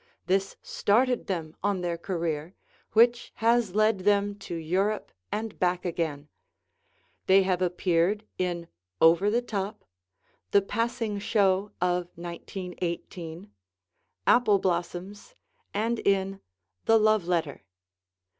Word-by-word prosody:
This 195 +1 0
started 245 +4 +1
them 165 -4 -3
on 200 -3 +1
their 175 -1 -1
career, 170 -1 -3 0.4
which 235 +2 +4
has 230 -4 +2
led 215 -1 +3
them 205 +1 +2
to 175 - -6
Europe 190 +6 -1 0.2
and 220 0 -4
back 180 0 +1
again. 160 -4 -2 1.0
They 190 +1 +6
have 185 -1 0
appeared 180 +3 +1
in 175 -2 -2 0.3
"Over 170 +5 +5
the 235 +3 +1
Top," 205 -2 -4 0.6
"The 200 - +4
Passing 230 0 -2
Show 200 -1 +2
of 180 0 +1
1918," 175 0 -6 0.7
"Apple 215 -5 +5
Blossoms," 185 - -3 0.4
and 225 +3 0
in 195 0 0 0.4
"The 225 - +6
Love 215 -4 +3
Letter." 165 -5 -1
190 Hz, 110 wpm, -27 LUFS, 175-210 Hz, 1.0 s, They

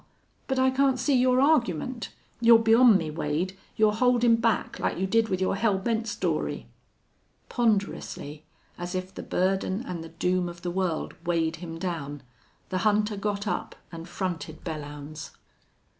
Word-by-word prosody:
But 265 - -1
I 260 0 +4
can't 265 0 +2
see 255 +3 +1
your 255 0 +4
argument. 255 - +1 0.3
You're 235 -1 +7
beyond 225 0 +6
me, 160 -4 -4
Wade. 160 +5 -2 0.2
You're 215 -2 +3
holdin' 240 0 +4
back, 230 -1 0
like - - -1
you 190 - 0
did 225 +3 +2
with 185 - 0
your 190 +1 +1
hell 205 -1 +2
bent 225 +3 -1
story." 210 - -2 0.8
Ponderously, 200 - -1 0.4
as 175 +1 -4
if 185 +1 -4
the - - -7
burden 190 +3 0
and 170 -2 -5
the 165 - -9
doom 180 +2 0
of 175 0 -11
the 175 - -2
world 180 -3 -2
weighed 165 -2 0
him 165 -1 -7
down, 150 -5 -4 0.5
the 185 - -1
hunter 210 0 +2
got 205 0 -2
up - - -3 0.2
and 165 +1 -8
fronted 175 -3 -4
Belllounds. 150 -1 -7
190 Hz, 160 wpm, -27 LUFS, 170-230 Hz, 0.8 s, You're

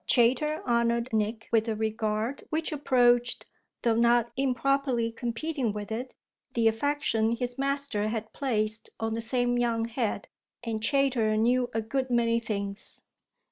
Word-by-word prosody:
Chayter 275 +6 +2
honoured 235 0 +1
Nick 220 +1 -1
with 225 -1 +3
a 220 - 0
regard 220 +3 -2
which 320 +1 -1
approached, 245 -4 +2 0.4
though 235 -1 +3
not 235 0 +3
improperly 260 -2 +1
competing 240 +1 -2
with 210 0 -6
it, 245 +4 -4 0.4
the 230 -1 +3
affection 225 -2 +1
his 245 +1 -4
master 275 -6 -1
had 220 0 -4
placed 220 -5 -1
on 225 0 -1
the 230 - -2
same 245 +1 0
young 230 -2 +1
head, 230 -3 -2 0.4
and 225 -2 -3
Chayter 245 -4 +2
knew 245 +2 +2
a 225 0 -1
good 260 +4 -2
many 235 -1 +2
things. 200 -3 -4
235 Hz, 140 wpm, -28 LUFS, 225-255 Hz, 0.4 s, with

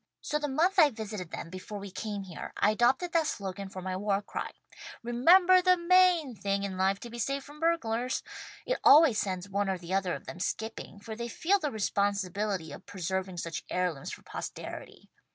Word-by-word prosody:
So 300 - -1
the 295 - -2
month 345 +8 +2
I 305 -3 +8
visited 215 -7 -6
them, 165 - -7
before 185 +3 -7
we 200 -1 -8
came 205 0 -4
here, 180 -3 -8
I 210 - +4
adopted 255 +10 +2
that 325 -2 +2
slogan 195 -6 -4
for 185 -1 -8
my 185 0 -3
war 200 +1 0
cry: - - -4 0.5
'"Remember 350 +11 +6
the 365 0 +4
main" 350 -5 +4
thing 200 -2 -1
in 195 -2 -3
life 190 +1 +1
to 240 - -7
be 240 - -7
saved 275 +4 -2
from 295 +1 -13
burglars!' 255 -7 0 0.4
It - - -1
always 290 -7 +7
sends 185 -1 -2
one 200 0 -1
or 190 - 0
the 175 +1 -6
other 190 -2 +1
of - - -10
them 170 - -8
skipping, 220 +1 -4
for 220 +1 -7
they 235 +1 -4
feel 370 - +1
the 300 - -1
responsibility 200 - -1
of - - -11
preserving 190 0 -3
such 165 -1 -4
heirlooms 180 -6 -2
for - - -9
posterity. - - -8
210 Hz, 195 wpm, -30 LUFS, 190-290 Hz, 0.5 s, I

